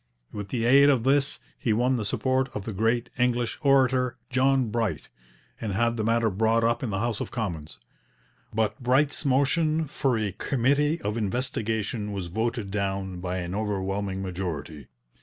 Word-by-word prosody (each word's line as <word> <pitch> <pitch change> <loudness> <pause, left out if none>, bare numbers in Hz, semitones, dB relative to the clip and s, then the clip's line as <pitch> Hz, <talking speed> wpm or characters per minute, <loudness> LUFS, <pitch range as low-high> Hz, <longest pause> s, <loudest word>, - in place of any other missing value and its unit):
With 105 -2 -5
the 115 +2 -2
aid 140 +4 +7
of 130 -5 +3
this 140 +2 +2 0.2
he 115 - +1
won 125 +4 +2
the 110 - -3
support 130 +4 0
of 100 - -4
the 110 - -4
great 115 +4 0
English 120 -1 +1
orator, 130 -3 +3
John 130 -1 +2
Bright, 105 - -2 0.5
and 110 -3 -2
had 115 +3 +1
the 110 - -2
matter 115 0 +2
brought 110 +3 +2
up 120 +1 +1
in 125 - -2
the 95 - -2
House 115 +1 -1
of - - -4
Commons. 85 - -4 0.7
But 110 +4 -1
Bright's 135 +5 +2
motion 155 +4 +2
for 135 -3 0
a 105 -2 -1
committee 145 - +1
of 105 +2 -2
investigation 110 -1 -2
was 95 -3 -4
voted 110 +1 -2
down 95 -2 -2
by 90 0 -3
an 90 0 -4
overwhelming 100 -1 -2
majority. 85 -6 -5
115 Hz, 165 wpm, -26 LUFS, 100-130 Hz, 0.7 s, aid